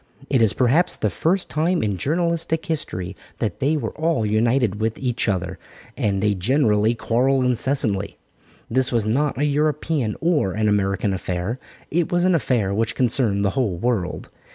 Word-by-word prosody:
It 130 Hz, -4 st, +3 dB
is 110 Hz, -2 st, +3 dB
perhaps 145 Hz, +9 st, +2 dB
the -, -, -1 dB
first 180 Hz, +3 st, 0 dB
time 165 Hz, +2 st, 0 dB
in 105 Hz, -2 st, 0 dB
journalistic 165 Hz, -, -1 dB
history 100 Hz, -, -3 dB, 0.2 s
that 110 Hz, -, -3 dB
they 145 Hz, +3 st, +1 dB
were -, -, -3 dB
all 160 Hz, -8 st, 0 dB
united 110 Hz, 0 st, +1 dB
with 110 Hz, 0 st, -1 dB
each 125 Hz, -4 st, -1 dB
other, 95 Hz, -2 st, -2 dB, 0.4 s
as 100 Hz, -2 st, 0 dB
they 105 Hz, 0 st, +2 dB
generally 110 Hz, +1 st, +2 dB
quarrel 130 Hz, +4 st, +1 dB
incessantly. 120 Hz, -5 st, 0 dB, 0.5 s
This 130 Hz, +2 st, 0 dB
was 115 Hz, -4 st, +1 dB
not 135 Hz, +7 st, 0 dB
a 145 Hz, -, +1 dB
European 150 Hz, -4 st, 0 dB
or 160 Hz, -, +1 dB
an 110 Hz, +2 st, 0 dB
American 100 Hz, -1 st, +1 dB
affair; 95 Hz, +5 st, -3 dB, 0.3 s
it 170 Hz, +1 st, 0 dB
was 175 Hz, 0 st, +2 dB
an 185 Hz, -, +4 dB
affair 120 Hz, -, +1 dB
which 110 Hz, +2 st, 0 dB
concerned 115 Hz, -5 st, +1 dB
the 95 Hz, -, +2 dB
whole 110 Hz, -6 st, 0 dB
world. 100 Hz, -4 st, -2 dB
120 Hz, 165 wpm, -22 LUFS, 105-150 Hz, 0.5 s, an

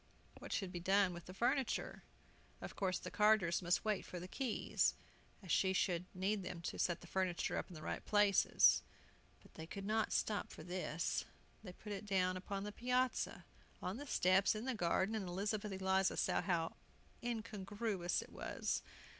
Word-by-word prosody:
What -, -, -9 dB
should 190 Hz, -3 st, -1 dB
be 175 Hz, -, -4 dB
done 190 Hz, +1 st, +3 dB
with 175 Hz, 0 st, -8 dB
the 185 Hz, -, -9 dB
furniture? 240 Hz, +4 st, 0 dB, 0.6 s
Of -, -, -7 dB
course 185 Hz, -3 st, 0 dB
the -, -, -7 dB
carters 210 Hz, -5 st, +4 dB
must 175 Hz, +3 st, +1 dB
wait 215 Hz, -2 st, +1 dB
for 180 Hz, -, -7 dB
the 180 Hz, -, -7 dB
keys, 250 Hz, +3 st, 0 dB, 0.5 s
as 185 Hz, -, -5 dB
she 190 Hz, -1 st, +3 dB
should 180 Hz, -2 st, +1 dB
need 195 Hz, +3 st, 0 dB
them 180 Hz, -2 st, -5 dB
to -, -, -4 dB
set 175 Hz, -2 st, +1 dB
the -, -, -11 dB
furniture 185 Hz, -1 st, 0 dB
up -, -, -2 dB
in 180 Hz, -, -11 dB
the 155 Hz, -, -9 dB
right -, -, -3 dB
places. 205 Hz, -2 st, +5 dB, 0.6 s
But -, -, -19 dB
they 160 Hz, -, -8 dB
could 195 Hz, +3 st, -6 dB
not 220 Hz, +1 st, +1 dB
stop 210 Hz, -2 st, 0 dB
for -, -, -10 dB
this. 175 Hz, -2 st, -2 dB, 0.4 s
They 180 Hz, -4 st, -8 dB
put 210 Hz, +3 st, -9 dB
it 205 Hz, +1 st, -5 dB
down 185 Hz, -2 st, +2 dB
upon 195 Hz, +2 st, -4 dB
the 210 Hz, -, -4 dB
piazza, 250 Hz, +3 st, 0 dB, 0.3 s
on 185 Hz, +4 st, -3 dB
the 290 Hz, +2 st, -7 dB
steps, 190 Hz, -1 st, +4 dB
in 215 Hz, +3 st, -4 dB
the 260 Hz, -, 0 dB
garden, 190 Hz, +1 st, +1 dB
and 210 Hz, -4 st, -2 dB
Elizabeth 205 Hz, +3 st, -2 dB
Eliza 190 Hz, 0 st, +1 dB
saw -, -, +2 dB
how 170 Hz, -3 st, -1 dB, 0.4 s
incongruous 210 Hz, -4 st, -2 dB
it -, -, -16 dB
was! -, -, -2 dB
195 Hz, 180 wpm, -38 LUFS, 180-210 Hz, 0.6 s, places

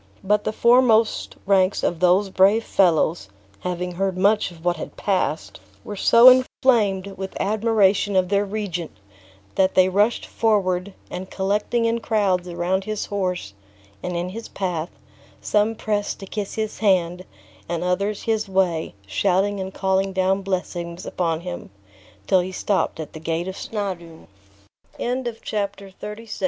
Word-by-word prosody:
But 210 Hz, +1 st, +1 dB
the -, -, 0 dB
foremost 235 Hz, -1 st, +3 dB
ranks 190 Hz, -1 st, +2 dB
of 170 Hz, -, 0 dB
those 185 Hz, +2 st, +3 dB
brave 200 Hz, +5 st, +4 dB
fellows, 170 Hz, -, +2 dB, 0.3 s
having 180 Hz, 0 st, -3 dB
heard 190 Hz, +1 st, -2 dB
much 205 Hz, +3 st, +3 dB
of 170 Hz, -1 st, -15 dB
what 175 Hz, -1 st, +1 dB
had -, -, -8 dB
passed, 185 Hz, -5 st, -1 dB, 0.2 s
were 210 Hz, -, -6 dB
so 230 Hz, +5 st, +6 dB
inflamed 225 Hz, -7 st, +4 dB
with 190 Hz, 0 st, -5 dB
admiration 205 Hz, -1 st, +2 dB
of 185 Hz, -1 st, +2 dB
their 200 Hz, 0 st, +2 dB
regent, 195 Hz, -5 st, -4 dB, 0.6 s
that 190 Hz, 0 st, +2 dB
they 185 Hz, 0 st, +5 dB
rushed 205 Hz, +5 st, +2 dB
forward, 195 Hz, -4 st, 0 dB, 0.2 s
and 185 Hz, +1 st, -6 dB
collecting 210 Hz, +4 st, 0 dB
in 230 Hz, 0 st, +1 dB
crowds 200 Hz, -6 st, 0 dB
around 180 Hz, +2 st, -1 dB
his 215 Hz, -1 st, -3 dB
horse, 180 Hz, -, -3 dB, 0.5 s
and 180 Hz, -1 st, -3 dB
in 175 Hz, +1 st, -2 dB
his 225 Hz, +4 st, -7 dB
path, 180 Hz, -3 st, -3 dB, 0.5 s
some 210 Hz, +2 st, +1 dB
pressed 205 Hz, -1 st, -2 dB
to -, -, -6 dB
kiss 200 Hz, +1 st, -5 dB
his 215 Hz, -1 st, -3 dB
hand, 185 Hz, -4 st, +2 dB, 0.5 s
and 170 Hz, 0 st, -2 dB
others 200 Hz, +3 st, -1 dB
his 220 Hz, -2 st, -1 dB
way, 180 Hz, -, 0 dB
shouting 195 Hz, -, +1 dB
and 190 Hz, 0 st, -4 dB
calling 190 Hz, 0 st, 0 dB
down 190 Hz, +1 st, +1 dB
blessings 180 Hz, -2 st, -4 dB
upon 165 Hz, -2 st, -1 dB
him, 175 Hz, 0 st, -7 dB, 0.6 s
till 190 Hz, -, +4 dB
he 180 Hz, +1 st, -3 dB
stopped 190 Hz, -2 st, -1 dB
at 155 Hz, -, -7 dB
the 155 Hz, -, -8 dB
gate 165 Hz, +2 st, -2 dB
of 190 Hz, -, -5 dB
Snawdoun. 185 Hz, -8 st, -5 dB, 1.2 s
Chapter 200 Hz, -2 st, -4 dB
XXXVII. 210 Hz, +4 st, -9 dB
190 Hz, 145 wpm, -22 LUFS, 180-210 Hz, 1.2 s, so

